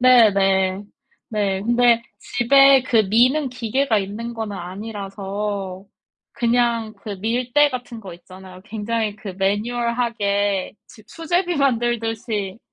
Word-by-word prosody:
네 245 -4 +7
네네 195 0 +1 0.5
네. 200 -3 -1
근데 240 0 +3 0.2
집에 275 +2 +4
그 235 - 0
미는 260 +6 +3
기계가 245 -1 0
있는 220 +4 -5
거는 215 -3 -5
아니라서 195 0 -5 0.5
그냥 235 -2 0
그 215 - -8
밀대 250 +6 +2
같은 245 -2 -6
거 195 -5 -9
있잖아요 185 +1 -13
굉장히 220 -1 -3
그 200 -4 -8
매뉴얼하게 205 -2 -1
집 215 -2 -17
수제비 350 +1 -1
만들듯이 230 -5 -1
225 Hz, 240 characters per minute, -21 LUFS, 200-240 Hz, 0.5 s, 네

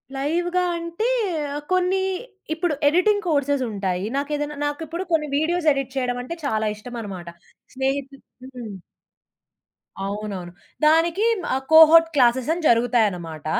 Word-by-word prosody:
లైవ్‌గా 345 +6 0
అంటే, 335 +7 -3 0.6
కొన్ని 370 +1 +2 0.5
ఇప్పుడు 330 -1 -1
ఎడిటింగ్ 405 +6 +2
కోర్సెస్ 285 -3 +1
ఉంటాయి. 190 -2 -2
నాకేదైనా 295 +1 -2
నాకిప్పుడు 320 +4 -4
కొన్ని 305 -2 +1
వీడియోస్ 320 +1 +1
ఎడిట్ 275 -1 -4
చేయడం 245 -1 -1
అంటే 335 +7 -6
చాలా 220 -4 0
ఇష్టం 240 +4 -10
అనమాట. 185 -5 -7 0.5
స్నేహితు 270 +1 -2 0.4
హ్మ్. 215 -6 -7 1.3
అవునవును. 200 -3 -5 0.3
దానికి 330 +6 +3 0.3
ఆహ్, 265 +1 -1
కోహోర్ట్ 325 +1 +8
క్లాసెస్ 250 +1 +3
అని 345 - -4
జరుగుతాయనమాట. 210 - +1
280 Hz, 115 wpm, -23 LUFS, 230-330 Hz, 1.3 s, కోహోర్ట్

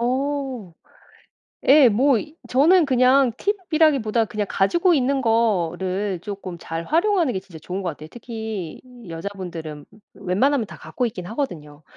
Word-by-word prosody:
어 260 -5 -2 1.0
예 275 -2 +8
뭐 245 +3 +3
이 310 +5 -9
저는 320 +7 +5
그냥 255 -1 +4
팁이라기보다 310 - +1
그냥 210 -1 -3
가지고 345 - +2
있는 270 0 +1
거를 190 -4 0
조금 195 -4 -7
잘 165 +1 -5
활용하는 340 - +2
게 190 - -3
진짜 175 -4 -13
좋은 185 +5 -5
것 180 - -2
같아요. 155 +1 -10
특히 220 -7 -6 0.3
여자분들은 165 -4 -7 0.3
웬만하면 215 +6 +1
다 - - -11
갖고 250 - -3
있긴 180 -6 -6
하거든요. 160 - -5
225 Hz, 295 characters per minute, -22 LUFS, 185-275 Hz, 1.0 s, 예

